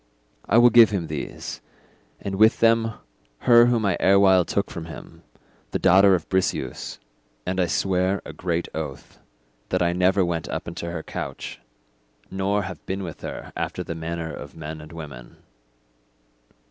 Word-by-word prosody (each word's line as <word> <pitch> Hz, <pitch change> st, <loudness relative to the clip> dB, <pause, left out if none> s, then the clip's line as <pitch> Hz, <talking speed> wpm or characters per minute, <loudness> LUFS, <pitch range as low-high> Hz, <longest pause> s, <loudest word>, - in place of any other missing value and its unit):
I 110 Hz, -, +5 dB
will 120 Hz, 0 st, +7 dB
give 115 Hz, -1 st, +8 dB
him 95 Hz, -6 st, -2 dB
these, 75 Hz, -3 st, -6 dB, 0.6 s
and 100 Hz, -, -5 dB
with 110 Hz, +2 st, +5 dB
them 115 Hz, 0 st, +3 dB, 0.5 s
her 120 Hz, -1 st, +7 dB
whom 120 Hz, -3 st, +1 dB
I 95 Hz, -3 st, +1 dB
erewhile 95 Hz, -2 st, +5 dB
took 100 Hz, -, -1 dB
from 85 Hz, -2 st, -6 dB
him, 80 Hz, -, -11 dB, 0.5 s
the -, -, -1 dB
daughter 95 Hz, +1 st, +6 dB
of 85 Hz, -, -4 dB
Briseus; 90 Hz, -9 st, -2 dB, 0.5 s
and 95 Hz, +1 st, -2 dB
I 90 Hz, -, +2 dB
swear 95 Hz, +2 st, +1 dB
a -, -, -8 dB
great 85 Hz, -1 st, -2 dB
oath 75 Hz, -4 st, -7 dB, 0.5 s
that 90 Hz, -1 st, +1 dB
I 85 Hz, 0 st, +1 dB
never 95 Hz, +1 st, +3 dB
went 85 Hz, -2 st, -3 dB
up -, -, -4 dB
into 85 Hz, 0 st, -5 dB
her 85 Hz, -2 st, -5 dB
couch, -, -, -6 dB, 0.7 s
nor 100 Hz, +2 st, 0 dB
have 95 Hz, -3 st, -8 dB
been 95 Hz, +1 st, -3 dB
with 85 Hz, -3 st, -8 dB
her -, -, -7 dB
after -, -, -3 dB
the -, -, -5 dB
manner 80 Hz, 0 st, -4 dB
of -, -, -9 dB
men 80 Hz, +1 st, -7 dB
and 75 Hz, +1 st, -12 dB
women. 75 Hz, -7 st, -10 dB
90 Hz, 160 wpm, -24 LUFS, 85-100 Hz, 0.7 s, give